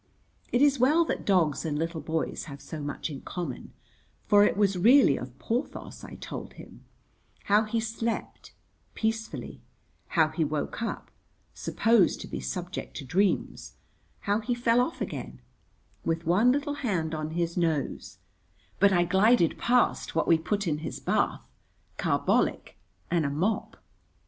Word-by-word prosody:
It 245 +3 +3
is 285 -2 +4
well 305 +7 +4
that - - -3
dogs 175 -7 +2
and 155 -3 -2
little 165 +1 -2
boys 160 +2 -3
have 140 -2 -9
so 150 +2 -8
much 145 +2 -4
in 140 - -7
common, 170 -9 -6 0.5
for 205 0 +6
it 205 - +2
was 200 -2 +3
really 230 - +6
of 125 0 -7
Porthos 235 - -4
I - - -9
told - - -7
him; - - -13 0.6
how 210 +2 +3
he 225 +2 -1
slept 225 +1 -4 0.4
(peacefully), 220 0 -3 0.5
how 160 -2 +3
he 160 - -1
woke 150 +7 -3
up 230 - -4 0.4
(supposed 225 -4 +2
to - - -7
be - - -5
subject 180 +2 -5
to 140 - -6
dreams), 190 +9 0 0.5
how 205 +1 +1
he 240 +2 -2
fell 240 0 +3
off 290 +7 -3
again - - -5 0.6
(with 165 0 -1
one 200 +9 +4
little 285 +2 -1
hand 170 - -1
on 155 0 -3
his 170 -1 -1
nose), 160 -5 -1 0.6
but 200 +1 +5
I 175 -2 +4
glided 190 +1 +3
past 245 -7 +1
what 165 - +1
we 165 -1 +5
put 200 +6 -1
in 150 -2 0
his 155 - -6
bath - - 0 0.5
(carbolic - - +1 0.4
and 170 -2 +2
a 140 - 0
mop). 180 +10 -1
185 Hz, 155 wpm, -28 LUFS, 160-225 Hz, 0.6 s, for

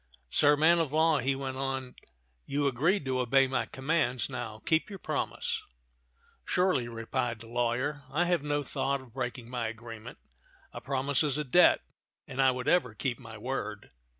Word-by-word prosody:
Sir 145 0 +5
man 165 +3 +5
of 160 -4 0
law," 160 0 +3
he 135 +2 +1
went 135 -1 -4
on, 135 -1 -3 0.5
"you 145 +1 0
agreed 145 +7 +2
to 130 -1 0
obey 135 +2 +4
my 130 - -1
commands; 130 -3 0
now 110 -3 -5
keep 165 +2 +2
your 200 - -7
promise." - - -2 0.8
"Surely," 180 -10 +1
replied 115 0 -2
the 115 - -11
lawyer. 125 +4 -1
"I 170 +5 +2
have 175 -3 +2
no 145 0 -1
thought 140 0 -1
of 125 -4 -16
breaking 125 -2 -4
my 120 -2 -2
agreement. 115 +1 -8 0.6
A - - -7
promise 135 +1 +1
is 145 -3 +1
a 150 - 0
debt, 165 +6 +5 0.5
and 135 0 -1
I 135 - +6
would 125 +1 -2
ever 135 -10 +2
keep 120 +1 -2
my 115 -3 -10
word. 110 -3 -4
135 Hz, 175 wpm, -30 LUFS, 120-145 Hz, 0.8 s, I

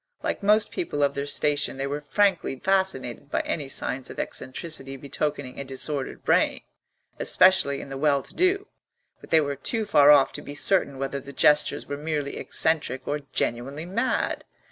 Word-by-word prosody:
Like - - -2
most 210 +2 +3
people 320 - -2
of 140 0 +2
their 140 0 -4
station 145 -1 +1
they 135 - -2
were 145 +2 -3
frankly 190 0 +1
fascinated 145 -8 0
by - - 0
any 145 -4 -3
signs 130 -1 -2
of - - -10
eccentricity 135 -1 -3
betokening 140 -1 -4
a - - -3
disordered 135 +1 -4
brain, - - +2 0.6
especially 185 -7 +4
in - - -10
the 135 0 -6
well 140 -2 +2
to - - -14
do; 380 +2 +1 0.5
but - - -15
they 160 - +5
were 140 -1 -2
too 220 - -1
far 145 -7 +5
off 145 -2 +6
to - - -6
be 145 - -9
certain 145 -4 +1
whether 135 +1 -3
the 140 +1 -11
gestures 150 +1 +3
were 145 - -5
merely 150 -2 -3
eccentric 155 -5 0
or 150 +1 -1
genuinely 135 +7 -2
mad. 230 +8 -1
145 Hz, 175 wpm, -25 LUFS, 135-165 Hz, 0.6 s, off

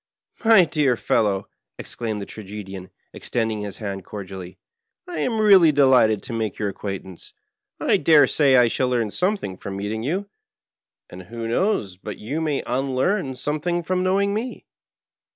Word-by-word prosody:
My 220 -5 +7
dear 145 -7 +1
fellow,'' 105 -5 0 0.3
exclaimed 110 -4 -4
the - - -7
Tragedian, 95 -3 -8 0.2
extending 110 -3 -2
his 100 -2 -6
hand 100 -3 -5
cordially, 95 -2 -8 0.3
" 450 - -57
I 355 - -5
am 225 -3 0
really 195 -7 +7
delighted 130 -7 +4
to 130 - -6
make 110 -3 -2
your 105 - -1
acquaintance; 95 -2 -7 0.5
I - - +3
dare 150 0 +6
say 140 -3 +3
I 120 -1 +6
shall 125 +2 0
learn 115 -4 0
something 180 - -1
from 100 -1 -6
meeting 105 +2 -3
you, 180 - -2 0.8
and 90 - -9
who 115 +3 -6
knows 115 - 0
but 105 +2 -7
you 140 +9 -4
may 150 -3 -1
unlearn 135 +5 -1
some 150 +4 -2
thing 175 +1 -1
from 185 +1 -1
knowing 195 +2 +1
me. 230 +3 -4
125 Hz, 160 wpm, -23 LUFS, 105-170 Hz, 0.8 s, My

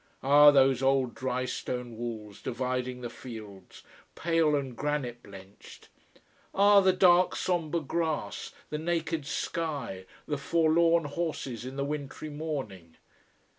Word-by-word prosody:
Ah, 145 +2 +8
those 135 -2 +4
old, 135 -2 +2
drystone 125 -1 -3
walls 110 -3 -6
dividing 125 0 -3
the 120 - -5
fields 105 -6 -11 0.3
pale 165 -3 +2
and 135 -4 -3
granite 135 -4 -2
blenched! 95 0 -14 0.7
Ah, 200 +1 +6
the 190 -1 +5
dark, 180 -1 +4
sombre 170 -2 -1
grass, 160 +1 -3 0.2
the 150 - -2
naked 165 -2 -2
sky! 145 - -3 0.2
the 145 -2 -3
forlorn 165 +2 +3
horses 145 -6 -4
in 130 +1 -7
the 140 0 -2
wintry 150 +1 -5
morning! 130 - -6
140 Hz, 120 wpm, -29 LUFS, 125-160 Hz, 0.7 s, Ah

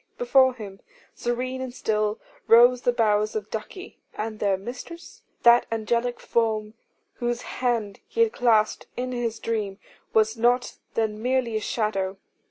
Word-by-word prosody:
Before 265 - +4
him, 200 -4 -9 0.3
serene 255 +2 -3
and 260 -1 -4
still, 215 -3 -1 0.3
rose 245 +2 +7
the 245 - +2
bowers 215 -2 +1
of 210 -1 -4
Ducie. 365 - -7 0.2
And 215 0 -4
their 200 -2 +1
mistress? 295 - -9 0.2
That 235 0 +6
angelic 235 +2 -1
form 220 -2 0 0.4
whose 240 0 -2
hand 230 -5 -2
he 460 - -1
had 455 -1 +3
clasped 220 -3 +2
in 255 +1 -2
his 235 -2 -2
dream, 210 -4 -3 0.3
was 220 0 +3
not 240 +2 +1 0.2
then 215 -1 -1
merely 250 -2 0
a - - +1
shadow. 195 -4 -1
230 Hz, 145 wpm, -25 LUFS, 215-245 Hz, 0.4 s, rose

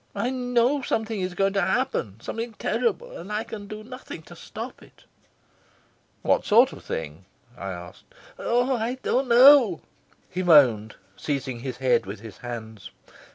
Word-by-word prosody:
I 245 - -1
know 250 +2 +1
something 220 -4 -2
is 185 -1 -3
going 195 +1 +1
to 195 - +1
happen, 235 - -1
something 230 - -5
terrible, 230 0 -2
and 185 +5 -8
I 210 +1 -1
can 220 -3 -8
do 215 +1 -8
nothing 255 +3 -9
to - - -13
stop - - -8
it." - - -19 1.2
"What - - +2
sort 235 +5 +5
of - - -12
thing?" 80 +3 -6 0.3
I 95 -6 -6
asked. 90 0 -10 0.3
"Oh, 245 +2 +1
I 235 +2 -2
don't 260 +1 +1
know," 245 - +7 0.5
he 185 - -4
moaned, 125 - +5 0.2
seizing 135 -4 -3
his 125 0 -5
head 130 -6 +2
with 100 +1 -6
his 110 -3 -11
hands. 110 -3 -8
200 Hz, 155 wpm, -25 LUFS, -, 1.2 s, know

